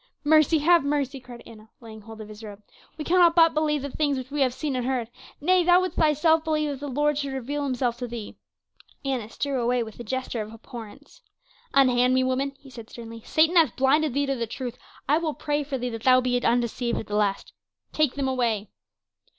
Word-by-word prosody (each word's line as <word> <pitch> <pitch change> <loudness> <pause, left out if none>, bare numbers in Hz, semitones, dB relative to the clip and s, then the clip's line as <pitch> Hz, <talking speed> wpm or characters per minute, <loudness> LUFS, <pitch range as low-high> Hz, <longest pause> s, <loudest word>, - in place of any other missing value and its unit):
"Mercy 310 +1 +4
have 335 +2 +4
mercy!" 280 -1 -1
cried 245 -1 -12
Anna, 220 -1 -14
laying 220 -2 -11
hold 220 +1 -11
of 215 - -9
his 215 +1 -12
robe. 210 -1 -10 0.3
"We 305 - -5
cannot 345 -1 +4
but 330 -1 +6
believe 300 -2 0
the 280 - -5
things 290 -2 0
which 260 +1 -7
we 295 0 -2
have 260 -2 +3
seen 280 +2 -3
and 250 - -1
heard. 250 -3 -2 0.3
Nay, 365 +3 +3
thou 355 +1 +5
wouldst 370 0 -3
thyself 315 +1 +3
believe 305 -2 0
if 275 - -6
the 290 - -6
Lord 295 +2 0
should 280 -2 -3
reveal 280 +3 -3
himself 250 -3 -1
to 245 0 -5
thee." 235 -3 -7 0.7
Annas 250 -5 -3
drew 275 -3 -1
away 240 0 +1
with 220 0 -11
a - - -5
gesture 255 0 -3
of 215 0 -7
abhorrence. 235 - -12 0.5
"Unhand 255 -2 +4
me, 260 - +3
woman," 265 +2 -1
he 275 -2 -16
said 230 -3 -11
sternly. 230 -1 -10
"Satan 320 +3 +3
hath 320 -8 +4
blinded 270 +1 +2
thee 285 0 +1
to 275 -1 -1
the 235 -2 -3
truth; 245 +1 -6 0.3
I 295 +4 +3
will 315 -3 -2
pray 295 0 -1
for 275 -1 -4
thee 250 0 -3
that 225 -1 -6
thou 255 +1 +5
be 245 -1 0
undeceived 240 0 0
at - - -4
the 210 - -4
last. 205 -2 -1 0.4
Take 305 -4 +1
them 275 -1 -1
away." 230 -6 -1
265 Hz, 220 wpm, -25 LUFS, 235-295 Hz, 0.7 s, but